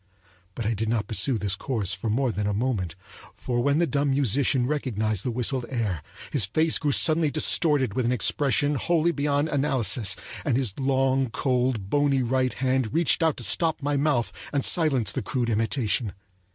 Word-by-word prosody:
But 115 - -4
I 115 - +1
did 110 +1 -2
not 110 -3 -1
pursue 115 +3 -1
this 100 -2 -1
course 105 -4 -3
for 95 +5 -4
more 125 +3 +1
than 105 -1 -2
a 105 - -1
moment; 105 -8 -2 0.4
for 120 -1 -2
when 140 +3 +2
the 170 - +3
dumb 145 -2 0
musician 135 -1 +2
recognized 110 -8 -2
the - - -2
whistled 125 +1 -1
air 105 - -2 0.3
his 120 -10 +2
face 155 +9 +1
grew 150 -2 0
suddenly 155 +2 +4
distorted 145 - +2
with 130 - -1
an 120 - +1
expression 145 +3 +1
wholly 170 +3 +1
beyond 145 -1 0
analysis, 120 -8 +1 0.3
and 135 -6 0
his 125 -8 0
long, 135 -1 +1
cold, 125 -5 -1
bony 145 -2 +2
right 130 +1 0
hand 130 -3 0
reached 170 +1 +3
out 160 -2 +1
to 120 - -5
stop 160 +6 +1
my 145 0 0
mouth 140 -4 0 0.2
and 140 -2 +1
silence 135 -11 +1
the - - -3
crude 120 -3 -2
imitation. 115 0 -1
130 Hz, 180 wpm, -25 LUFS, 115-145 Hz, 0.4 s, suddenly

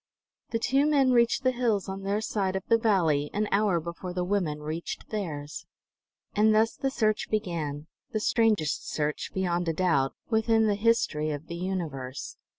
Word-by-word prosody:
The 230 - 0
two 270 +5 +2
men 275 -4 +4
reached 235 +1 +3
the 255 - +4
hills 235 -5 0
on 195 0 -5
their 200 +2 -1
side 195 -3 -1
of 190 - -3
the 230 -1 +4
valley 165 -10 +2
an 210 +1 +1
hour 200 -4 +3
before 170 +2 -6
the 180 - 0
women 180 -6 -1
reached 155 +3 -5
theirs. 155 -9 -5 0.7
And 215 +1 +4
thus 220 +1 +3
the 270 - -1
search 215 -5 0
began, 160 -8 -2 0.3
the 215 - -1
strangest 215 -9 +1
search, 150 -1 -2
beyond 175 -2 -1
a - - +1
doubt, 155 -6 +1
within 225 0 +3
the 210 - +3
history 205 -8 +1
of 150 0 -4
the 170 - -6
universe. 160 -8 -4
190 Hz, 170 wpm, -28 LUFS, 160-220 Hz, 0.7 s, men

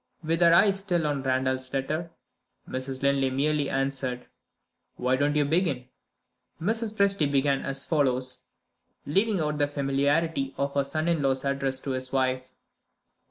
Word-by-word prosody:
With 165 +2 0
her 170 -1 +6
eyes 195 +3 +5
still 175 -5 0
on 145 -2 -1
Randal's 130 0 -1
letter, 155 +5 -2 0.6
Mrs. 130 +1 -4
Linley 140 -1 +2
merely 145 +2 0
answered: 135 -2 -2 0.7
"Why 125 +1 +1
don't 145 +2 +1
you 150 -1 +3
begin?" 145 -5 0 0.7
Mrs. 220 +4 -1
Presty 195 -8 +3
began 140 0 +2
as 135 0 +2
follows, 130 -5 0 0.6
leaving 195 +6 +1
out 150 -1 -1
the 145 - +3
familiarity 140 +1 0
of 140 0 -1
her 140 -1 +1
son 155 +4 -2
in 170 -3 +1
law's 135 -1 0
address 135 -1 -1
to 135 - -4
his 130 0 -4
wife. 130 -1 -1
140 Hz, 150 wpm, -27 LUFS, 130-160 Hz, 0.7 s, her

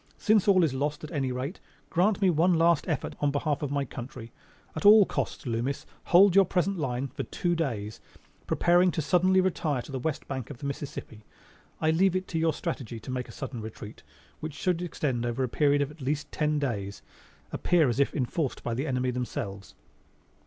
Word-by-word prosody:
Since 215 -2 +3
all 185 -3 +5
is 155 -5 +1
lost 145 +3 -2
at 155 - -7
any 135 -5 -1
rate, 130 +7 -4 0.3
grant 195 +3 +2
me 185 - +5
one 170 +3 +3
last 165 -1 +3
effort - - -2
in 145 - +3
behalf 145 +1 -1
of 145 - -2
my 140 0 -1
country. 120 -2 -8 0.4
At 155 - -4
all 210 0 +8
costs, - - -3
Loomis, 120 +3 -2 0.2
hold 185 +1 +6
your 195 - +8
present 185 +1 0
lines 130 -2 -2
for 145 - -4
two 175 +5 -1
days, 115 -11 -3 0.5
preparing 175 +1 +4
to 160 - -1
suddenly 185 +5 +4
retire 155 -8 -1
to - - -11
the 135 - -3
west 150 +3 -3
bank 130 -3 -5
of - - -8
the 140 - -8
Mississippi. 140 -6 -6 0.6
I 155 - +2
leave 185 +3 +3
it 185 0 -1
to 165 - -1
your 165 0 +3
strategy 130 - -4
to 130 - -8
make 125 0 -3
a - - -8
sudden 130 -4 -6
retreat 110 -1 -9 0.4
(which 155 -2 -6
should 180 -2 0
extend 140 -8 -2
over 120 +2 -1
a - - +1
period 145 +3 +2
of 140 - -5
at 150 0 -15
least 145 +3 -2
ten 150 -1 0
days) 105 -9 -3 0.5
appear 170 -4 +2
as 120 +2 -1
if 140 - +2
enforced 135 +2 -2
by 120 - -2
the 135 +6 -2
enemy 125 -1 0
themselves." 100 -5 -5
145 Hz, 200 wpm, -28 LUFS, 125-170 Hz, 0.6 s, all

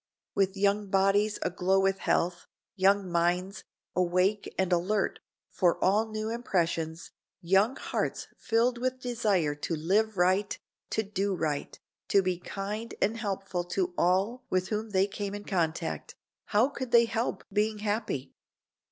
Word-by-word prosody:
With 195 0 +1
young 200 +1 +2
bodies 195 +2 +3
aglow 185 +2 +1
with 195 0 +2
health, 175 +1 0 0.3
young 195 0 +3
minds, 180 +3 0 0.3
awake 185 +3 +1
and 190 -1 +1
alert 195 +4 0 0.3
for 175 -2 +2
all 210 +4 +2
new 215 0 -3
impressions, 170 -8 -1 0.3
young 195 +8 +3
hearts - - -3
filled 235 +1 +1
with 255 +1 -1
desire 215 -11 +1
to 145 +3 -3
live 200 +7 +1
right, 185 +3 +2 0.3
to 220 - 0
do 200 -1 -1
right, 150 -4 -3 0.3
to 195 - +4
be 180 -1 -1
kind 205 +5 -5
and 215 +3 +1
helpful 195 -5 -3
to 180 0 -1
all 195 +9 +1
with 185 0 0
whom 220 +1 -2
they 190 -1 +3
came 200 0 -4
in 205 - -7
contact, 165 -4 -2 0.3
how 230 +6 +3
could 260 -3 -5
they 235 0 +6
help 230 +1 -2
being 215 +1 +1
happy? 210 - -2
195 Hz, 145 wpm, -29 LUFS, 180-215 Hz, 0.3 s, they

